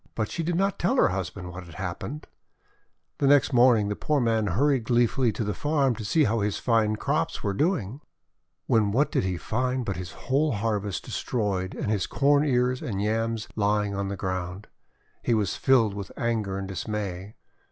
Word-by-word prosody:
But 110 Hz, -2 st, -2 dB
she 170 Hz, -, -2 dB
did 165 Hz, +1 st, -1 dB
not 195 Hz, +2 st, 0 dB
tell 235 Hz, +10 st, +1 dB
her 255 Hz, -, +4 dB
husband 95 Hz, -1 st, -4 dB
what 90 Hz, +1 st, -8 dB
had 85 Hz, -2 st, -13 dB
happened. 95 Hz, -, -5 dB, 0.9 s
The 140 Hz, -, +2 dB
next 145 Hz, 0 st, +4 dB
morning 120 Hz, -4 st, +5 dB
the 105 Hz, -, -2 dB
poor 150 Hz, +5 st, 0 dB
man 115 Hz, -3 st, +1 dB
hurried 130 Hz, +5 st, +2 dB
glee 120 Hz, +1 st, +4 dB
fully 120 Hz, 0 st, +1 dB
to 115 Hz, -, -2 dB
the 105 Hz, 0 st, -2 dB
farm 140 Hz, +2 st, +1 dB
to 115 Hz, -, -7 dB
see 155 Hz, +9 st, +2 dB
how 115 Hz, -3 st, +1 dB
his 105 Hz, 0 st, -1 dB
fine 110 Hz, -3 st, +2 dB
crops 150 Hz, +8 st, -1 dB
were 100 Hz, -2 st, 0 dB
doing. 140 Hz, -, -1 dB, 0.6 s
When 105 Hz, -3 st, +2 dB
what 140 Hz, +8 st, +2 dB
did -, -, +1 dB
he 90 Hz, -2 st, -1 dB
find 125 Hz, +5 st, -1 dB
but 95 Hz, -3 st, -3 dB
his 90 Hz, -2 st, -6 dB
whole 145 Hz, +2 st, 0 dB
harvest 105 Hz, -3 st, -2 dB
destroyed 100 Hz, -5 st, -2 dB
and 105 Hz, -, -2 dB
his 105 Hz, -4 st, 0 dB
Corn 145 Hz, +1 st, +3 dB
Ears 125 Hz, -2 st, +1 dB
and 100 Hz, -5 st, -3 dB
Yams 110 Hz, +1 st, -1 dB
lying 105 Hz, -1 st, +1 dB
on 100 Hz, 0 st, -2 dB
the 100 Hz, 0 st, -4 dB
ground! 95 Hz, +1 st, -4 dB, 0.6 s
He 120 Hz, -, +1 dB
was 105 Hz, -3 st, 0 dB
filled 120 Hz, -6 st, +3 dB
with 100 Hz, -2 st, -6 dB
anger 110 Hz, -6 st, -1 dB
and 100 Hz, -1 st, -4 dB
dismay. 100 Hz, 0 st, -4 dB
110 Hz, 195 wpm, -26 LUFS, 100-130 Hz, 0.9 s, morning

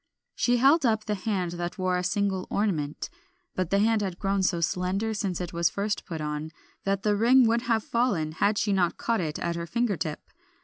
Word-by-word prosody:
She 245 Hz, 0 st, +2 dB
held 280 Hz, +6 st, +5 dB
up 220 Hz, -3 st, +1 dB
the 210 Hz, -, -1 dB
hand 190 Hz, -3 st, -2 dB
that 175 Hz, 0 st, -4 dB
wore 185 Hz, -1 st, 0 dB
a 180 Hz, -, -1 dB
single 195 Hz, -1 st, -1 dB
ornament; 160 Hz, -8 st, -1 dB, 0.5 s
but 185 Hz, -3 st, -2 dB
the 200 Hz, -, +2 dB
hand 220 Hz, +1 st, +3 dB
had 190 Hz, -3 st, -3 dB
grown 195 Hz, 0 st, 0 dB
so 180 Hz, -2 st, +1 dB
slender 185 Hz, +6 st, -1 dB
since 195 Hz, -4 st, -2 dB
it 180 Hz, -2 st, -5 dB
was 170 Hz, 0 st, +2 dB
first 205 Hz, +1 st, -2 dB
put 165 Hz, -2 st, -5 dB
on, 150 Hz, +1 st, -3 dB, 0.4 s
that 195 Hz, 0 st, 0 dB
the 210 Hz, -1 st, +2 dB
ring 245 Hz, +4 st, +5 dB
would 230 Hz, +1 st, +2 dB
have 220 Hz, -2 st, +2 dB
fallen 205 Hz, -11 st, 0 dB
had 200 Hz, +6 st, +1 dB
she 205 Hz, -1 st, +1 dB
not 180 Hz, -3 st, +1 dB
caught 230 Hz, -4 st, 0 dB
it 155 Hz, -2 st, -3 dB
at 170 Hz, 0 st, -2 dB
her 170 Hz, 0 st, -4 dB
finger 235 Hz, -1 st, 0 dB
tip. 155 Hz, -3 st, -3 dB
195 Hz, 215 wpm, -27 LUFS, 175-220 Hz, 0.5 s, held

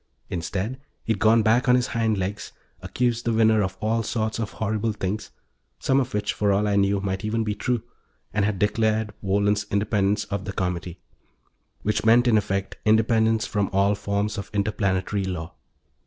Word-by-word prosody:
Instead, 95 Hz, +9 st, -3 dB, 0.2 s
he'd 110 Hz, -3 st, -1 dB
gone 110 Hz, +1 st, +4 dB
back 120 Hz, +4 st, +3 dB
on 125 Hz, -, +7 dB
his 125 Hz, -1 st, +2 dB
hind 110 Hz, -2 st, 0 dB
legs, 100 Hz, +2 st, -4 dB, 0.3 s
accused 120 Hz, -1 st, -1 dB
the 115 Hz, -, 0 dB
winner 110 Hz, -1 st, +4 dB
of 95 Hz, -1 st, -2 dB
all 115 Hz, +2 st, 0 dB
sorts 110 Hz, 0 st, -2 dB
of 110 Hz, -2 st, -3 dB
horrible 110 Hz, +1 st, -1 dB
things 100 Hz, +1 st, -3 dB, 0.5 s
some 135 Hz, +1 st, +2 dB
of 130 Hz, -2 st, -1 dB
which, 105 Hz, 0 st, -1 dB
for 105 Hz, -1 st, +1 dB
all 100 Hz, +2 st, +2 dB
I 100 Hz, -, +1 dB
knew, 100 Hz, 0 st, +2 dB
might 95 Hz, 0 st, -3 dB
even 110 Hz, +1 st, 0 dB
be 105 Hz, -1 st, -1 dB
true 120 Hz, +3 st, -1 dB, 0.5 s
and 105 Hz, 0 st, +1 dB
had 100 Hz, -1 st, 0 dB
declared 110 Hz, +1 st, +1 dB
Wohlen's 100 Hz, +1 st, +1 dB
independence 100 Hz, 0 st, +1 dB
of 100 Hz, 0 st, -4 dB
the 100 Hz, -, -4 dB
Comity. 90 Hz, -1 st, -3 dB, 0.9 s
Which 105 Hz, -, 0 dB
meant, 120 Hz, +3 st, +5 dB
in 115 Hz, -, +4 dB
effect, 100 Hz, -1 st, -1 dB
independence 110 Hz, +1 st, +3 dB
from 100 Hz, -4 st, -1 dB
all 100 Hz, +1 st, +3 dB
forms 100 Hz, +1 st, -2 dB
of 100 Hz, -, -7 dB
interplanetary 100 Hz, -1 st, 0 dB
law. 90 Hz, -2 st, -5 dB
105 Hz, 175 wpm, -24 LUFS, 100-110 Hz, 0.9 s, on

